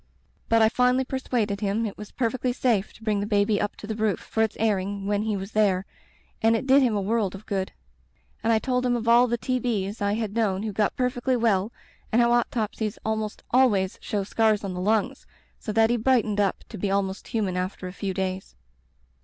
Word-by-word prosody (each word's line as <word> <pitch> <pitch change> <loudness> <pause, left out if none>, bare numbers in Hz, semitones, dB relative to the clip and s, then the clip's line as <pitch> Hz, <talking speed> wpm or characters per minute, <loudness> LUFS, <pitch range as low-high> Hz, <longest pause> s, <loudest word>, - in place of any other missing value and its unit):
But 225 -1 +5
I 220 - +5
finally 250 +2 +2
persuaded 235 -6 -2
him 210 +2 0
it 205 - -4
was 210 - -9
per 235 -3 -1
fectly 250 -1 -2
safe 225 -7 +1
to 225 - -17
bring 215 -2 +1
the 200 - -2
baby 205 0 +2
up 205 - -2
to - - -10
the 220 - -3
roof 215 -2 0
for 220 - -3
its 220 -1 0
airing 200 -2 0
when 205 0 0
he 215 -1 -1
was 195 +2 -6
there, 195 -3 +2 0.6
and 225 +1 +4
it 225 - -2
did 270 +1 +6
him 240 -5 +2
a 205 - 0
world 205 -1 0
of 195 - -11
good. 190 -2 -2 0.7
And 225 - +2
I 225 - +4
told 250 +2 0
him 245 -1 +2
of 230 -1 -3
all 240 +2 +6
the 240 0 0
T'b's 230 -5 -2
I 200 0 +1
had 215 -2 -2
known 210 -4 0
who 215 -2 -3
got 210 +1 0
perfecdy 250 0 0
well 220 -3 +1 0.4
and 230 - +3
how 235 0 +4
autopsies 220 -3 -1
almost 220 -1 -2
always 210 -7 +3
show 205 -2 -2
scars 215 +1 +1
on 195 -2 -3
the 180 - -4
lungs, 210 +2 0 0.3
so 215 - -4
that 225 +1 +3
he 240 - +2
brightened 225 -3 +2
up 200 -2 0
to 215 - -8
be 200 - -1
almost 195 0 -1
human 205 -5 -1
after 185 +1 -3
a 180 - -7
few 195 0 -3
days. 190 0 -3
215 Hz, 220 wpm, -25 LUFS, 200-235 Hz, 0.7 s, did